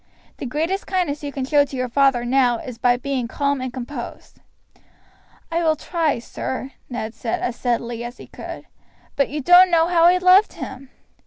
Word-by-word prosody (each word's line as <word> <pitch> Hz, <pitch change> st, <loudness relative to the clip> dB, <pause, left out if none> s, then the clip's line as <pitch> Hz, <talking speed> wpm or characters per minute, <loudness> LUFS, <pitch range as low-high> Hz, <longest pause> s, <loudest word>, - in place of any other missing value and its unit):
The 270 Hz, -, -5 dB
greatest 325 Hz, +9 st, -2 dB
kindness 355 Hz, -6 st, -1 dB
you 285 Hz, -, -4 dB
can 270 Hz, -2 st, -3 dB
show 290 Hz, +1 st, +4 dB
to 285 Hz, -, -8 dB
your 255 Hz, -1 st, -1 dB
father 260 Hz, -1 st, +2 dB
new 250 Hz, -1 st, +3 dB
is 235 Hz, 0 st, -8 dB
by 245 Hz, +1 st, +3 dB
being 255 Hz, -1 st, -2 dB
calm 280 Hz, +2 st, -1 dB
and 255 Hz, -1 st, -4 dB
composed." 250 Hz, 0 st, -8 dB, 1.1 s
"I 335 Hz, +1 st, 0 dB
will 320 Hz, -2 st, +2 dB
try, 320 Hz, -3 st, -1 dB
sir," 260 Hz, +3 st, -5 dB, 0.2 s
Ned 230 Hz, -3 st, -4 dB
said 230 Hz, 0 st, -3 dB
as 240 Hz, -, -2 dB
steadily 235 Hz, -1 st, -2 dB
as 240 Hz, +1 st, -7 dB
he -, -, -11 dB
could; -, -, -9 dB, 0.5 s
"but 280 Hz, -, +1 dB
you 295 Hz, +1 st, -4 dB
don't 355 Hz, +5 st, +7 dB
know 335 Hz, -1 st, +3 dB
how 335 Hz, -2 st, +4 dB
I 355 Hz, +1 st, +6 dB
loved 370 Hz, +3 st, +5 dB
him!" 265 Hz, 0 st, -8 dB
275 Hz, 185 wpm, -21 LUFS, 245-325 Hz, 1.1 s, don't